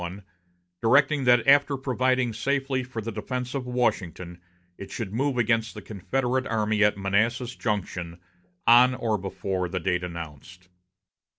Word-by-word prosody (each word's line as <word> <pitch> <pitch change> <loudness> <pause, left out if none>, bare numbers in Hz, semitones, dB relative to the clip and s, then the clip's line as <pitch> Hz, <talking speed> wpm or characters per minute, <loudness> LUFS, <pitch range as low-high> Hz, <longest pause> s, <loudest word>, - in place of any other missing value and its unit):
I, 90 +4 -6 0.6
directing 140 +3 +3
that 120 -1 +5
after 140 0 +5
providing 130 -2 0
safely 135 +3 -1
for 120 -3 -6
the 115 - -4
defense 125 +4 -4
of 135 -3 -4
Washington, 90 -8 -2 0.3
it 100 +1 -9
should 105 -3 -5
move 135 +2 0
against 115 -1 +1
the - - -7
Confederate 130 +5 -2
army 110 -1 +1
at 105 -1 +3
Manassas 115 +5 0
Junction, 90 -5 -3 0.5
on 125 +2 +6
or 110 -4 -1
before 95 -1 -3
the 90 - -2
date 90 0 -1
announced. 85 +2 -9
115 Hz, 140 wpm, -26 LUFS, 95-130 Hz, 0.6 s, on